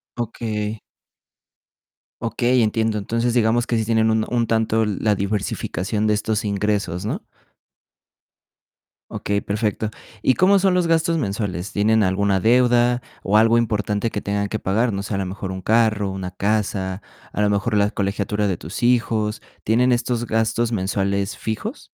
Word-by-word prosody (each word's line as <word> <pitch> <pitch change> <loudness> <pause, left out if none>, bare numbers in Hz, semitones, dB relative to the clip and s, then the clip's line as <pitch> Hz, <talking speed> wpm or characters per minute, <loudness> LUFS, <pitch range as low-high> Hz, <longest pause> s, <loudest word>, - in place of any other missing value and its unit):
Okey. 110 -2 -3 1.4
Okey, 120 +2 +2
entiendo. 110 0 0
Entonces 115 +4 -1
digamos 120 +1 +2
que 120 - +1
sí 110 - 0
tienen 110 0 +2
un 110 0 +1
un 120 -1 0
tanto, 110 0 +1
la 105 +1 0
diversificación 100 0 -2
de 105 - +3
estos 110 +1 -1
ingresos, 100 -3 -1
¿no? - - -3 1.9
Okey, 100 0 -1
perfecto, 105 +1 -2 0.3
¿y 130 - +4
cómo 195 +6 +4
son 190 -1 +3
los 180 -1 +2
gastos 165 0 +2
mensuales? 100 - -3
¿Tienen 110 +1 +3
alguna 95 0 +1
deuda 120 +1 +3 0.2
o 105 +2 +3
algo 115 +2 +5
importante 105 -1 0
que - - -2
tengan 100 0 -2
que 110 - -3
pagar? 115 +5 +1
No 100 -1 -3
sé, 100 - -5
a 95 - 0
lo 95 - -1
mejor 95 0 -5
un 95 - -6
carro, 110 -1 +2
una 95 -1 -5
casa, 100 -1 -1 0.3
a - - -2
lo 105 - +3
mejor 105 +2 +1
la 100 0 +3
colegiatura 100 +1 -1
de 90 - -1
tus 85 +10 -7
hijos, 115 -3 +1 0.2
¿tienen 125 +3 +3
estos 120 -1 -1
gastos 115 +1 0
mensuales 100 0 -1
fijos? 210 - -5
110 Hz, 155 wpm, -21 LUFS, 100-115 Hz, 1.9 s, algo